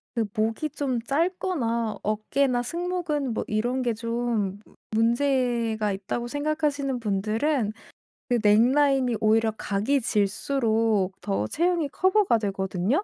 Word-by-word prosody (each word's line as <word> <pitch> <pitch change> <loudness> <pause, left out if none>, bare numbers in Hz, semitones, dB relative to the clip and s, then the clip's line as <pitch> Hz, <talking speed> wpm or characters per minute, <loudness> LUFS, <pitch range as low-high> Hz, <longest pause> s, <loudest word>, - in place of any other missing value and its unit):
그 230 - +1
목이 225 +8 -1
좀 260 -5 -2
짧거나 275 - -1
어깨나 245 +4 0
승모근 335 -4 -2
뭐 - - -2
이런 240 +5 0
게 240 -2 0
좀 230 -3 -2
무 - - -22 0.3
문제가 235 -4 +1
있다고 200 +5 -4
생각하시는 290 -2 -1
분들은 220 +4 0 0.6
그 245 -1 +2
넥 210 +1 +6
라인이 270 -4 +3
오히려 220 +1 +3
각이 220 +6 0
질수록 215 -2 0
더 195 - -1
체형이 340 - 0
커버가 375 - +3
되거든요. 195 - -1
235 Hz, 260 characters per minute, -25 LUFS, 215-280 Hz, 0.6 s, 넥